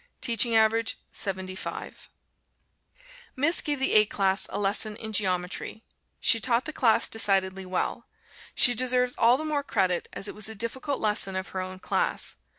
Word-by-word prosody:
Teaching 235 -2 +3
average 225 +1 +2
75. 190 -1 -6 1.3
Miss 295 +6 +2
gave 295 -2 -2
the 265 - +1
A 215 0 +7
class 195 -1 0
a - - -4
lesson 205 +1 -1
in 220 0 -8
Geometry. 185 +2 -1 0.4
She 230 - +3
taught 240 +1 0
the 310 - -6
class 230 -5 +3
decidedly 195 -3 +1
well. 180 0 -3 0.5
She 245 - +4
deserves 250 +1 +1
all 235 +2 +4
the 310 - -5
more 300 -2 -1
credit, 185 -10 0
as 200 - -4
it - - -6
was 215 0 -4
a 220 - -6
difficult 260 +6 -2
lesson 210 -3 +1
of 190 0 -4
her 190 - -4
own 185 0 -6
class. - - -1
220 Hz, 160 wpm, -26 LUFS, 190-245 Hz, 1.3 s, A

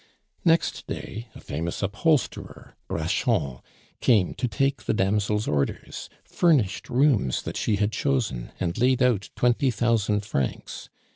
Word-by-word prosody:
Next 165 -1 +2
day 115 +4 -6
a - - -10
famous 85 +6 -4
upholsterer, 125 +9 -1
Braschon, 65 -3 0 0.4
came 105 -8 +3
to 125 - -2
take 135 +2 -1
the - - +1
damsel's 105 +2 +1
orders, 70 -2 -2
furnished 140 - +1
rooms 125 - +2
that - - -5
she 110 - +1
had 105 +1 0
chosen, 115 - -1
and 85 -1 -1
laid 125 +1 +3
out 115 -6 +1
twenty 125 +2 +2
thousand 110 -3 +1
francs. 70 -10 -3
110 Hz, 130 wpm, -25 LUFS, 95-125 Hz, 0.4 s, came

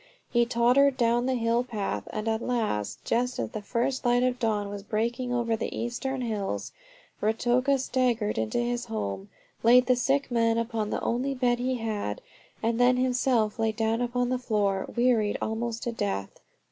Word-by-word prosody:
He 235 -1 +3
tottered 250 +3 +4
down 240 +1 +2
the 260 - +1
hill 235 0 +1
path, 220 -5 -3
and 215 +1 -4
at 220 0 0
last, 210 - -2
just 250 +2 0
as - - -3
the 215 - -5
first 240 +5 -1
light 245 0 +3
of 255 -1 0
dawn 215 -3 0
was 200 0 -6
breaking 235 +5 -2
over 235 -2 +1
the 220 - -4
eastern 255 +3 -3
hills, 215 -5 -3 0.5
Ruatoka 240 +5 +2
staggered 245 - 0
into 110 -1 -1
his 240 0 -1
home, 100 -2 -4 0.3
laid 245 +2 +6
the 255 0 +4
sick 270 +2 0
man 230 -1 +2
upon 230 -2 -1
the - - -2
only 265 +4 0
bed 245 -1 +1
he 255 +1 0
had, 220 - -3 0.4
and 230 +1 +1
then 250 +1 +5
himself 250 -3 +1
laid 220 -1 +1
down 225 +1 0
upon 245 0 0
the 255 0 0
floor, 205 -5 0
wearied 235 -4 +2
almost 230 +1 -3
to 240 - -1
death. 100 - -2
235 Hz, 175 wpm, -27 LUFS, 220-250 Hz, 0.5 s, laid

